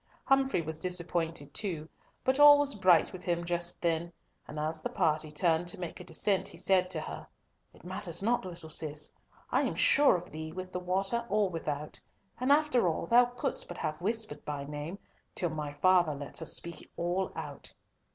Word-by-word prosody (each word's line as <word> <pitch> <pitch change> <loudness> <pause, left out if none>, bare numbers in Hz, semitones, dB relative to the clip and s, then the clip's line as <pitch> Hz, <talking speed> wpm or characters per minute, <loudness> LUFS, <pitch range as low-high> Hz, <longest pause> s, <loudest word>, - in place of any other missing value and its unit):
Humfrey 270 -9 +2
was 160 0 -4
disappointed 170 -4 -2
too; 170 -7 -2 0.4
but 260 +2 +1
all 290 0 +10
was 285 -1 +3
bright 185 -5 +4
with 185 -1 -8
him 170 -1 -1
just 175 0 0
then, 170 0 0 0.4
and 150 - -8
as 155 +1 -2
the - - -3
party 155 -1 +1
turned 165 +2 +1
to 175 - -2
make 175 -2 -5
the - - -9
descent, 195 -2 0
he - - -7
said 185 -1 +2
to - - 0
her, - - -7 0.4
"It - - -20
matters - - -2
not, 240 +3 +1
little 170 -3 -8
Cis! 150 -1 -1 0.4
I'm - - +1
sure 290 -6 +5
of 180 0 -6
thee 155 +1 -6
with 185 +2 -7
the 180 - -3
water 195 +6 0
or 205 -2 +2
without, 150 -3 -4 0.4
and 255 +3 +1
after 290 -8 +4
all, 165 0 -1
thou 240 +6 +6
couldst 245 +2 -2
but 175 - -8
have 155 +2 -3
whispered 215 -6 -1
my 145 -2 -3
name, 150 +5 -6 0.4
till 175 -3 0
my 150 -2 -4
father 175 +1 +3
lets 140 +3 -4
us 160 - -1
speak 170 -1 -4
all 175 +2 -1
out!" - - -7
175 Hz, 190 wpm, -30 LUFS, 160-200 Hz, 0.4 s, all